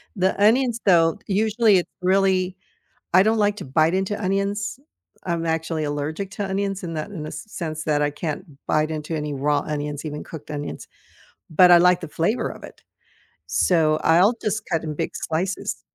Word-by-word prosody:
The 190 +1 0
onions 235 +2 +3
though, 170 0 +4
usually 215 +1 +3
it's 175 - -1
really, 185 0 +2 0.6
I 185 +1 +7
don't 220 +1 +2
like 205 -1 +2
to - - -7
bite 155 +6 +2
into 190 +3 -1
onions. 200 +4 -1 0.5
I'm 170 -2 -1
actually 160 -1 -1
allergic 150 +6 -3
to 205 -1 -3
onions 195 -1 -2
in 165 - -4
that 155 +5 -4
in 170 -7 -6
the 155 - -6
sense 155 -2 -6
that 150 -1 +1
I 145 - +2
can't 150 +3 -4 0.2
bite 155 +1 +1
into 155 +1 -4
any 150 -1 -3
raw 145 +2 +1
onions, 150 -1 -4
even 150 -1 -5
cooked 155 -1 -9
onions, 145 0 -6 0.6
but 180 +3 +6
I 175 - +9
like 180 +1 +5
the 165 - -5
flavor 170 +10 -1
of - - -10
it, - - -12 0.7
so 155 -3 +2
I'll 180 +8 +5
just 215 +1 -1
cut 165 -1 0
in 155 - -4
big - - -2
slices. 180 +5 -3
175 Hz, 180 wpm, -23 LUFS, 155-195 Hz, 0.7 s, I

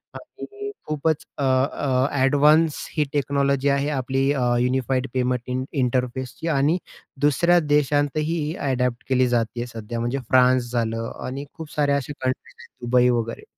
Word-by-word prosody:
आणि 410 0 -8 0.2
खूपच 155 0 0
अ, 140 - -2
अ, 130 0 +1
ॲडव्हान्स 145 +3 +4 0.2
ही 150 - +4
टेक्नॉलॉजी 140 -1 +1
आहे 140 +1 +1
आपली 135 0 0
अ, 135 - -2 0.2
युनिफाईड 130 +1 0
पेमेंट 125 -1 0
इं 130 0 -2 0.2
इंटरफेसची 125 +4 -2
आणि 150 +6 +3 0.4
दुसऱ्या 170 +5 +4
देशांतही 150 +1 +1 0.2
ॲडॅप्ट 125 -3 -1
केली 130 -1 +3
जाते 120 -1 -1
आहे 120 - -4
सध्या, 115 0 -6
म्हणजे 120 +4 -1
फ्रान्स 125 -1 +4
झालं 115 -1 -2
आणि 135 +3 -5
खूप 160 -2 -9
साऱ्या 145 -1 +2
अशा 140 +1 -5
कंट्रीज 130 0 -3
आहेत 135 - -15 0.2
दुबई 125 0 +4
वगैरे. 115 -1 -2
135 Hz, 145 wpm, -23 LUFS, 125-145 Hz, 0.4 s, ॲडव्हान्स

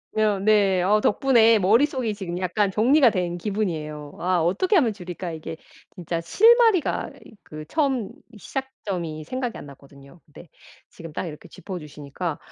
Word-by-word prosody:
어 215 -2 +2
네. 200 -3 +3
어 210 +3 +3
덕분에 230 0 +4
머릿속이 230 +4 +2
지금 185 -4 -6
약간 190 +3 0
정리가 250 +7 +4
된 180 -4 -2
기분이에요. 155 -7 -4
'아 180 -1 +1
어떻게 195 - +1
하면 250 - +3
줄일까?' 180 -2 -7
이게 160 0 -7 0.4
진짜 170 -2 -4
실마리가 445 - +3 0.2
이 - - -15
그 155 0 -10
처음 265 - 0 0.3
시작점이 190 - -5
생각이 250 - -4
안 - - -10
났거든요. 140 +3 -17
근데 155 +3 -15 0.4
지금 165 -2 -11
딱 - - -4
이렇게 160 +1 -9
짚어주시니까 150 -3 -7
190 Hz, 335 characters per minute, -23 LUFS, 165-230 Hz, 0.4 s, 덕분에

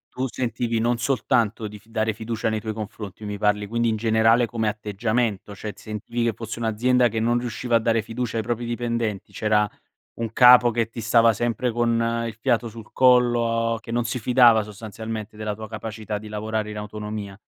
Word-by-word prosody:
Tu 130 +1 -1
sentivi 120 -1 -2
non 120 +1 +1
soltanto 115 -3 0
di 105 0 -10
f 110 - -27
dare 110 -1 -1
fiducia 110 +1 -3
nei 110 0 0
tuoi 110 0 -4
confronti. 105 -2 -7
Mi 105 -1 -5
parli, 105 0 +1
quindi 115 +2 0
in 110 - +1
generale 115 +2 +3
come 115 -1 -2
atteggiamento, 105 0 -2
cioè 105 +1 -6
ti - - -17
sentivi 110 +3 -4
che 115 - +1
fosse 115 +1 -7
un'azienda 120 +3 +2
che 115 -1 -2
non 120 +2 +2
riusciva 120 0 0
a - - 0
dare 115 -1 +1
fiducia 115 0 -4
ai 110 - 0
propri 120 +1 -2
dipendenti, 115 -3 -2
c'era 105 -1 +2 0.5
un 115 -2 -2
capo 125 0 +7
che 115 -1 0
ti 115 - -7
stava 115 +1 +4
sempre 120 +2 -1
con 115 0 0
il 115 - -6
fiato 120 -1 +1
sul 110 -1 -11
collo, 120 -2 +3
che 115 - -9
non 120 +1 +1
si 120 +2 -2
fidava 120 -1 +5
sostanzialmente 110 +1 -7
della 105 -1 -4
tua 110 +1 -8
capacità 110 -1 -5
di 110 - -10
lavorare 105 0 -3
in 105 - -6
autonomia. 105 -1 -6
115 Hz, 195 wpm, -24 LUFS, 105-120 Hz, 0.5 s, capo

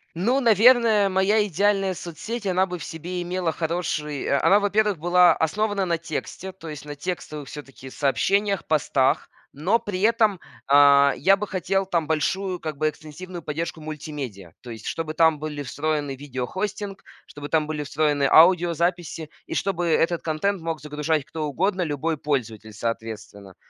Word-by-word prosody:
Ну, 235 +11 +1
наверное, 225 -2 +5
моя 195 +3 +2
идеальная 195 0 +1
соцсеть, 205 +7 -6
она 185 0 +2
бы 180 -2 -6
в - - -7
себе 175 +2 -5
имела 175 -1 -1
хороший 155 -3 -3
о 140 - +1
она, 200 - +6
во-первых, 205 -1 +1
была 175 +1 +5
основана 205 +4 0
на 170 -1 0
тексте, 165 +3 -6
то 165 -4 -10
есть 150 -1 -8
на 145 - -7
текстовых 150 -2 -5
всё-таки 135 -3 -10
сообщениях, 195 +9 0
постах. 140 -3 +1 0.2
Но 185 +11 +1
при 200 -4 -4
этом, 220 -3 +3 0.3
а, 140 0 +6
я 195 +7 +4
бы 205 +1 -5
хотел 195 +1 -1
там 170 -4 0
большую 180 +5 -1
как 155 -3 -5
бы 155 +1 +1
экстенсивную 160 +4 -9
поддержку 160 +1 -4
мультимедиа. 145 - -7
То 125 - -11
есть 115 - -9
чтобы 165 -1 -3
там 160 -1 +3
были 150 -1 -5
встроены 145 0 -2
видеохостинг, 190 +10 -5 0.2
чтобы 145 0 -9
там 155 -1 +2
были 150 -1 -4
встроены 145 0 0
аудиозаписи 170 -1 +3 0.2
и - - -6
чтобы 175 -3 -1
этот 165 +1 +2
контент 170 +4 -1
мог 165 -1 -3
загружать 150 0 -1
кто 160 -1 -4
угодно, 185 +6 0
любой 155 0 -1
пользователь, 115 -7 -3
соответственно. 110 -3 -6
165 Hz, 155 wpm, -24 LUFS, 150-190 Hz, 0.3 s, она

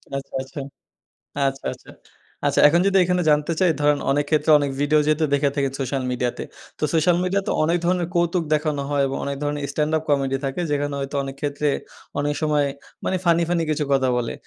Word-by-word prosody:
আচ্ছা, 135 0 -6
আচ্ছা। 135 +3 -8 0.9
আচ্ছা, 135 0 -4
আচ্ছা। - - -17 0.6
আচ্ছা, - - +1
এখন 170 +4 +3
যদি 195 -1 +3
এখানে 180 0 +1
জানতে 150 +3 +1
চাই 180 -3 +5
ধরেন, 145 0 +3
অনেক 145 +1 +1
ক্ষেত্রে 155 0 +2
অনেক 145 - -1
ভিডিও 150 +1 +3
যেহেতু 155 +1 +2
দেখে 140 0 +3
থাকেন 140 -2 0
সোশ্যাল 135 0 -2
মিডিয়াতে। 125 -1 -2 0.4
তো - - -4
সোশ্যাল 170 +2 +3
মিডিয়া 195 +2 +1
তে - - +1
অনেক 170 +3 +2
ধরনের 180 -1 +1
কৌতুক 170 0 +1
দেখানো 150 -2 0
হয় 145 -1 +1
এবং 135 - -3
অনেক 140 0 -2
ধরনের 145 0 -2
স্ট্যান্ড 150 0 0
আপ 155 - -5
কমেডি 135 -2 +1
থাকে, 135 +6 -2
যেখানে 145 0 -1
হয়তো 140 +1 -4
অনেক 135 0 -6
ক্ষেত্রে, 145 0 -1 0.5
অনেক 145 +1 0
সময় 150 -2 +2 0.4
মানে 185 - +1
ফানি, 170 0 +4
ফানি 170 -2 +1
কিছু 150 0 0
কথা 135 -1 +2
বলে। 120 -1 -2
150 Hz, 200 wpm, -22 LUFS, 140-165 Hz, 0.9 s, চাই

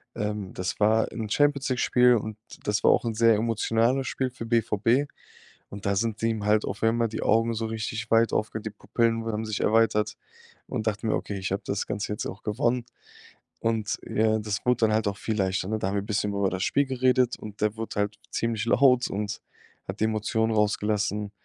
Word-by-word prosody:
Ähm, 105 -2 -3
das 90 0 -3
war 110 +1 +3
'n 110 -2 -5
Champions 145 +3 +2
League-Spiel 125 -1 +4
und 110 -1 -3 0.3
das 105 -1 0
war - - +6
auch - - +2
'n 115 - -1
sehr 115 0 +5
emotionales 115 +4 +1
Spiel 130 -1 -2
für 120 -2 -7
BVB. 115 +4 +2 0.6
Und 100 0 -9
da 100 - +2
sind 110 +1 -1
ihm 110 -2 0
halt 105 0 +3
auf - - -5
einmal 115 +1 +2
die 110 - -5
Augen 115 +1 +3
so 115 0 -2
richtig 110 0 -4
weit 115 0 +4
aufge 110 0 -1
die 110 - -4
Pupillen 115 +1 0
haben 110 -1 -2
sich 110 -1 -3
erweitert 110 -1 +2 0.5
und 110 - -3
dachte 105 +1 -3
mir: 110 - +1
„Okay, 100 - -4
ich 95 0 -3
hab 100 - -2
das 100 -1 -2
Ganze 105 +1 -3
jetzt - - -4
auch 95 - -7
gewonnen.“ 120 +3 0 0.8
Und 110 -2 -1
ja, 110 0 +2
das 105 -2 -4
wurde 125 -1 +3
dann 110 - 0
halt 110 0 +1
auch 100 - -6
viel 110 - -2
leichter, 95 -1 0
ne? 110 0 -1
Da 95 - -1
haben 100 - -2
wir 100 - +1
bisschen 105 0 -1
über 100 -1 +1
das 95 0 -2
Spiel 140 - +2
geredet 130 -1 +2
und 105 -1 -9
der 105 0 +1
wurde 115 -1 -5
halt 105 0 -1
ziemlich 115 -2 -1
laut 125 +1 +4
und 105 +1 -3 0.5
hat 95 +2 -5
die - - +4
Emotionen 110 +1 0
rausgelassen. 105 -1 0
110 Hz, 205 wpm, -26 LUFS, 105-115 Hz, 0.8 s, war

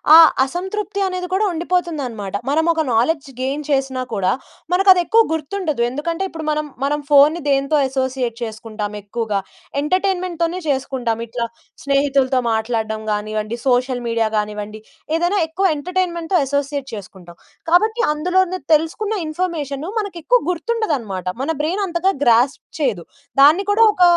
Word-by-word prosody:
ఆ - - +12 0.3
అసంతృప్తి 390 +6 -4
అనేది 365 -1 -3
కూడా 415 +3 +2
ఉండిపోతుందనమాట. 310 - -2 0.2
మనం 320 +3 +2
ఒక 320 - 0
నాలెడ్జ్ 275 +5 +1
గెయిన్ 280 +3 -2
చేసినా 270 -2 0
కూడా, 190 -2 +1 0.4
మనకు 385 +2 +4
అది 360 - +1
ఎక్కువ 455 +1 +5
గుర్తుండదు. 315 -3 -2
ఎందుకంటే, 330 +7 -3
ఇప్పుడు 320 -1 -6
మనం 305 0 -1 0.2
మనం 295 +1 0
ఫోన్‌ని 295 +4 +6
దేనితో 275 +2 +2
అసోసియేట్ 260 -3 -2
చేసుకుంటాం 215 -1 -5
ఎక్కువగా. 210 -1 -2 0.4
ఎంటర్టైన్‍మెంట్‍తోనే 365 0 0
చేసుకుంటాం. 260 -4 -1
ఇట్లా 235 +1 -3 0.4
స్నేహితులతో 275 -2 +2
మాట్లాడడం 220 -1 -1
గానియండి, 215 +2 -2
సోషల్ 250 0 +2
మీడియా 230 -1 +1
గానివ్వండి. 210 0 -4 0.4
ఏదైనా 350 +4 +1
ఎక్కువ 375 +5 -1
ఎంటర్టైన్‍మెంట్‍తో 355 +1 -1
అసోసియేట్ 280 0 -2
చేసుకుంటాం. 185 -4 -10 0.3
కాబట్టి, 435 +6 +3
అందులోనే 365 +3 +1
తెలుసుకున్న 325 +8 +1
ఇన్ఫర్మేషను 310 -3 -3
మనకెక్కువ 405 +4 +1
గుర్తుండదనమాట. 305 - -2
మన 295 - 0
బ్రైన్ 360 +7 -1
అంతగా 350 +3 +1
గ్రాస్ప్ 240 +3 +3 0.2
చేయదు. 225 - 0 0.4
దాన్ని 305 +8 +7
కూడా 430 +3 +5
ఒక 365 -3 +2
290 Hz, 130 wpm, -20 LUFS, 235-355 Hz, 0.4 s, ఆ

